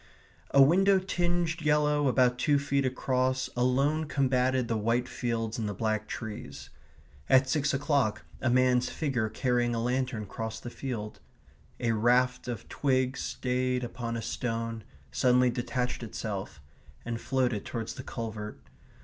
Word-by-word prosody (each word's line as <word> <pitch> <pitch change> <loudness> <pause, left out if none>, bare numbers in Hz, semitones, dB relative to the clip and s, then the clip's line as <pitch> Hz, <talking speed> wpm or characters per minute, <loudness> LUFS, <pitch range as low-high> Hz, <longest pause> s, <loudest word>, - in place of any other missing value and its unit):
A 140 - +7
window 190 +7 +5
tinged 175 -3 0
yellow 150 -1 +2
about 125 -1 +3
two 145 -2 +3
feet 140 -1 +1
across 130 0 0
alone 135 +6 +2
combated 130 -3 +1
the 115 - 0
white 115 +3 +1
fields 115 -3 -2
and 110 -2 -1
the 100 - -4
black 110 +1 -1
trees.... 110 -1 -7 0.6
At 130 0 +5
six 150 +2 +1
o'clock 140 -6 0 0.2
a 130 - +1
man's 125 0 +3
figure 130 -8 -1
carrying 120 +1 0
a - - -1
lantern 125 -2 -1
crossed 110 +3 -6
the 120 - -6
field.... 115 -6 -5 0.6
A 115 - +1
raft 125 +3 +2
of 120 -4 -5
twig 130 -2 +1
stayed 125 -1 -1
upon 120 -1 -4
a 115 - -4
stone, 115 -2 -3 0.3
suddenly 125 0 +3
detached 125 +1 -2
itself, 105 -7 -5 0.5
and 115 -1 -3
floated 125 -5 0
towards 115 -2 -4
the - - -7
culvert 110 - -6
125 Hz, 140 wpm, -29 LUFS, 115-135 Hz, 0.6 s, A